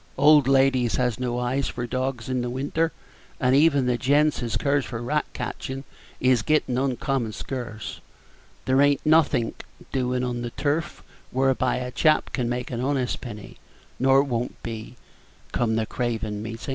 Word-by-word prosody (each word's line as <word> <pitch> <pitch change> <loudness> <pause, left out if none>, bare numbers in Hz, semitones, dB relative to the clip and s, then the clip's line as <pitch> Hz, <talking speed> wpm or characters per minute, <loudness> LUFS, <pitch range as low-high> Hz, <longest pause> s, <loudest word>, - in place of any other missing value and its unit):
Old 145 -1 +6
ladies 135 -3 +3
has 125 -1 0
no 125 -1 -1
eyes 125 +2 0
for 120 - -4
dawgs 130 -1 -3
in 130 -1 -1
the 120 - -2
winter; 145 +6 -1 0.5
and 130 -2 +3
even 145 -2 +4
the 125 -1 +1
gents 145 +4 +3
as 115 -2 -1
cares 140 0 +1
for 115 -3 -5
rat 150 +6 0
catchin' 135 0 -5 0.4
is 125 -3 +3
gettin' 150 -1 +1
uncommon 130 -3 -1
scarce. 120 -4 -6 0.6
There 130 +1 +3
ain't 145 0 +3
nothink 155 -7 +2 0.3
doin' 125 -1 0
on 120 -1 -2
the 120 - -3
turf 145 +6 -2 0.3
whereby 130 0 +1
a 125 0 -3
chap 155 +3 +2
can 120 -3 -1
make 125 +1 -3
an 120 -1 -2
honest 130 -2 -1
penny, 105 -4 -9 0.4
nor 135 +1 +5
won't 125 -3 -3
be, 115 +1 -6 0.6
come 110 -2 +1
the 110 0 0
Craven 110 -3 -3
Meetin'. 115 +4 -6
130 Hz, 160 wpm, -25 LUFS, 120-140 Hz, 0.6 s, Old